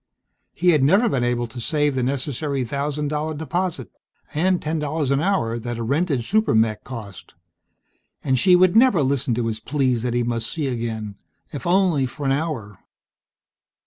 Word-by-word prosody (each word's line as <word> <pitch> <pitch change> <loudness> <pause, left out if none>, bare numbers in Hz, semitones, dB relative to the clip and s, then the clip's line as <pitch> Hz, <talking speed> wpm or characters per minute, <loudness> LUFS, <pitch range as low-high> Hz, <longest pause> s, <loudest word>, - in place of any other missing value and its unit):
He 180 +1 +2
had 155 -5 +4
never 195 - +4
been 135 - 0
able 120 0 0
to 120 +1 -8
save 150 +3 +1
the 130 - -1
necessary 135 +1 -2
thousand 145 +4 -2
dollar 155 +1 -2
deposit, 160 - -3 0.4
and 180 +4 +2
ten 155 0 -2
dollars 150 -1 -1
an 140 +1 +2
hour, 135 -12 0
that 120 0 -5
a 115 - -3
rented 140 +1 0
super 215 - +1
mech 110 -1 +2
cost. 110 -7 -9 0.9
And 130 -2 +1
she 180 +8 +6
would 185 +2 +4
never 225 - +5
listen 135 -2 0
to 120 0 -1
his 110 -1 -2
pleas 130 -1 0
that 120 0 -2
he 120 - +1
must 115 -1 -2
see 155 -3 -3
again 110 -4 -4 0.4
if 145 - -5
only 175 -7 +3
for 145 +3 -7
an 135 - +2
hour.... 135 - -3
140 Hz, 175 wpm, -22 LUFS, 120-160 Hz, 0.9 s, she